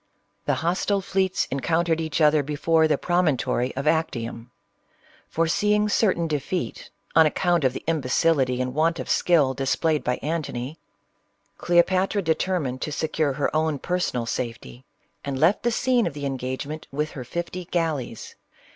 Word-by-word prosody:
The - - +2
hos 175 +2 +1
tile 200 -1 +2
fleets 190 -1 0
encountered 165 +4 +1
each 160 0 -2
other 150 0 +5
before 160 +3 +2
the 155 - +2
promon 175 -5 +1
tory 125 +1 -1
of 135 +2 -3
Actium. 120 -7 -1 0.8
Foreseeing 210 +6 +1
certain 185 -5 +2
defeat, 155 +4 -3 0.3
on 160 -1 +7
account 175 +1 +1
of 130 -1 +2
the - - -6
imbecility 140 -3 +1
and 130 0 -2
want 165 +3 +1
of - - -5
skill 150 -7 +3
displayed 150 +3 0
by 125 - 0
An 160 +3 0
tony, 135 +2 -6 0.8
Cleopatra 185 +3 +2
determined 160 -5 -1
to 150 - -3
secure 155 -1 0
her 145 +2 -1
own 155 -1 +1
personal 170 -7 -1
CLEOPATRA. 125 +2 -1
47 115 -1 -8 0.3
safety, - - -39 0.4
and 140 -1 -3
left, 165 +9 +3
the 240 - +1
scene 245 0 +2
of - - -5
the 145 -1 -4
engagement 135 +3 -4
with 150 +2 -2
her 130 - -7
fifty 175 +6 -5
galleys. 160 - -3
155 Hz, 160 wpm, -24 LUFS, 135-175 Hz, 0.8 s, on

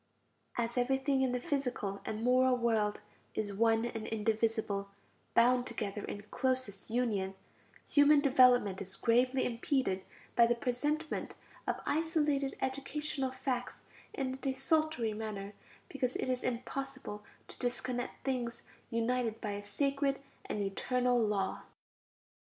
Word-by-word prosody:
As 235 +1 0
everything 265 +2 +2
in 260 -1 +2
the 250 - 0
physical 245 -8 -2
and 215 +1 -3
moral 255 +1 +4
world 220 -3 +1 0.3
is 205 -2 -2
one 225 +2 +3
and 225 -2 -4
indivisible, 220 -2 0 0.5
bound 245 +1 +5
together 205 -2 -3
in 205 - -5
closest 255 -3 -2
union, 215 -5 0 0.5
human 290 0 +6
development 250 -8 +5
is 195 0 -5
gravely 250 +4 +3
impeded 235 -5 0 0.3
by 235 -1 +7
the 240 - +3
presentment 295 +7 -2 0.3
of - - 0
isolated 295 -3 +1
educational 270 0 -2
facts 255 -1 -3 0.3
in 260 -2 -2
a - - -6
desultory 270 -2 +1
manner, 210 -2 -5 0.3
because 255 -3 -2
it - - -1
is 255 -1 0
impossible 255 -2 -4 0.2
to - - -10
disconnect 245 0 -3
things 245 -3 -2 0.3
united 230 -1 0
by 210 - -3
a 205 0 -4
sacred 275 +6 0 0.3
and 205 - -2
eternal 245 +5 +1
law. 205 -3 0
245 Hz, 125 wpm, -33 LUFS, 220-265 Hz, 0.5 s, by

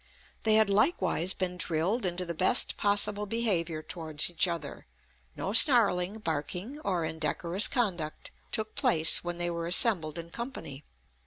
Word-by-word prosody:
They 215 -1 +5
had 220 -1 +5
likewise 200 - +1
been 180 -1 -3
drilled 180 +6 0
into 180 +1 -3
the 170 - -5
best 185 +9 +2
possible 205 0 +1
behaviour 180 -8 -1
towards 160 -1 0
each 175 +2 +1
other; 170 - -6 0.5
no 195 - -4
snarling, 215 - +4
barking, 180 - -5
or 180 - -2
indecorous 170 +5 0
conduct 180 - -3 0.2
took 215 0 -1
place 230 - +2
when 175 0 -4
they 175 0 -1
were 170 0 -4
assembled 175 -4 +2
in 170 0 -7
company. 165 - -8
180 Hz, 145 wpm, -28 LUFS, 165-215 Hz, 0.5 s, They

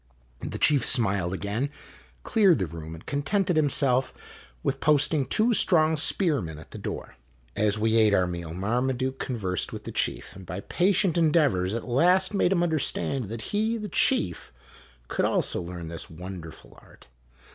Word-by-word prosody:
O - - -3
The - - -5
chief 145 -5 +3
smiled 100 -9 +2
again, 100 +8 -2 0.5
cleared 200 -7 +4
the 95 - -1
room, 80 0 -8
and 80 - -14
contented 180 +6 0
himself 140 -4 +2 0.5
with 135 - -1
posting 150 -1 +2
two 230 +2 +2
strong 160 -6 +4
spearmen 145 - 0
at 80 - -14
the - - -8
door. - - -7 0.4
As 105 0 +1
we 110 +1 +1
ate 110 -2 +4
our 95 -2 +3
meal 85 -2 -6
Marmaduke 125 +8 -2
conversed 95 -8 -3
with - - -8
the - - -7
chief, - - -2
and 95 - -11
by 90 +2 -6
patient 180 - +1
endeavors 145 - +2
at 115 - -5
last 180 - +3
made 195 -2 +2
him 175 -3 +2
understand 145 -5 0
that 110 +3 -6
he, 220 +2 0
the 210 -2 -6
chief, 90 - +1 0.6
could - - -2
also - - 0
learn 85 -1 -7
this 85 0 -7
wonderful 85 -1 -10
art. - - -19
125 Hz, 165 wpm, -26 LUFS, -, 0.6 s, cleared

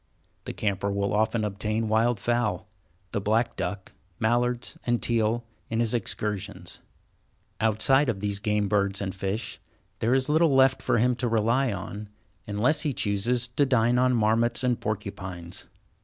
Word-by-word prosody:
The - - -5
camper 100 -1 -1
will 100 0 -1
often 110 +1 +1
obtain 105 +2 -2
wild 110 +1 +2
fowl, 120 -5 0 0.4
the 100 - -1
black 110 +4 +1
duck, 100 -2 -4 0.3
mallards, 120 +2 0
and 120 -1 +1
teal, 115 0 +1 0.2
in 115 - -1
his 115 -1 +1
excursions. 105 -4 -3 0.8
Outside 110 +6 +3
of 105 -5 -1
these 100 0 -2
game 105 0 0
birds 100 -1 +1
and 95 -2 -3
fish, 100 +3 -3 0.4
there 120 +3 +2
is 130 -1 +1
little 155 -1 +3
left 135 0 +4
for - - +1
him 125 +3 +3
to 125 - 0
rely 115 +3 +2
on, 100 +2 -6 0.4
unless 115 +9 +2
he 150 -3 0
chooses 115 +4 0
to 125 +4 +1
dine 125 -2 +3
on 125 0 +3
marmots 115 +2 +2
and 125 -2 +1
porcupines. 95 -4 -5
110 Hz, 155 wpm, -26 LUFS, 100-120 Hz, 0.8 s, left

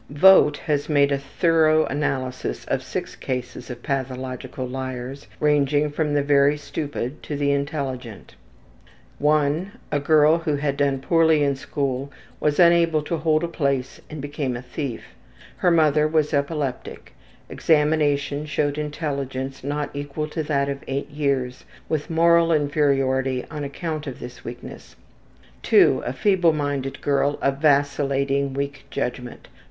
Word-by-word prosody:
Vogt 150 -1 +6
has 145 -1 -2
made 145 -1 +3
a 140 - +1
thorough 155 +2 +3
analysis 130 - -3
of - - -1
six - - -5
cases 125 -1 -5
of 120 -1 -8
pathological 130 -1 -4
liars, 130 +1 -6
ranging 150 0 +2
from 150 0 -1
the 145 - +2
very 140 +1 +4
stupid 145 -2 -5
to 150 - -5
the 140 0 +1
intelligent. 140 -6 -4 0.9
I. 150 +3 +2 0.2
A 145 - +1
girl, 155 +2 +4
who 155 -3 -1
had 140 -1 -1
done 140 -2 +1
poorly 160 0 +3
in 140 -1 +1
school 140 0 -3 0.3
was 150 -1 +1
unable 170 -3 +4
to 165 +2 -2
hold 155 0 +1
a - - 0
place 140 -5 -2
and 155 -2 -7
became 145 -4 -3
a 120 - -9
thief. 125 -1 -5 0.5
Her 180 - +2
mother 155 -2 +4
was 155 -1 +1
epileptic. 140 -2 -3 0.3
Examination 150 -2 +1
showed 145 0 -1
intelligence 140 -3 -4
not 145 +1 -3
equal 145 +2 -4
to 160 - -3
that 140 -2 0
of 140 0 -4
eight 140 +2 -3
years 135 -4 -1 0.2
with 155 +1 -2
moral 170 0 +4
inferiority 135 -4 +1
on 150 -2 -5
account 155 +1 -4
of 130 - -6
this 125 0 -10
weakness. 120 +1 -9 0.8
II. - - +6
A 125 - -2
feebleminded 145 -5 0
girl 145 0 +1
of 135 0 0
vacillating, 140 -2 +1
weak 140 0 -4
judgment. 125 0 -5
145 Hz, 140 wpm, -23 LUFS, 135-150 Hz, 0.9 s, Vogt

